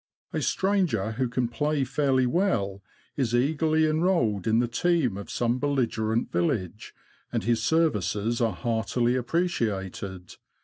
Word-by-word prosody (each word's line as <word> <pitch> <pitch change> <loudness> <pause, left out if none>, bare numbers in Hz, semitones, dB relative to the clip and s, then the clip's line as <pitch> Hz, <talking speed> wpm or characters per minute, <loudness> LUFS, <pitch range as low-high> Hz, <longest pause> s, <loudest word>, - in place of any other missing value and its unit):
A - - -1
stranger 180 - +1
who 125 +2 -1
can 125 0 0
play 150 +4 0
fairly 135 -1 +1
well 120 - 0 0.3
is 120 -4 0
eagerly 155 +4 +2
enrolled 155 - +1
in 110 0 +3
the 120 +1 +2
team 140 - +1
of 100 0 -7
some 120 +1 0
belligerent 120 -5 0
village, 110 - -2 0.4
and - - -1
his 115 +1 +1
ser 160 +7 +3
vices 105 +4 -2
are 115 -3 +2
heartily 120 +5 0
appreciated. 105 - -2
120 Hz, 135 wpm, -26 LUFS, 110-150 Hz, 0.4 s, in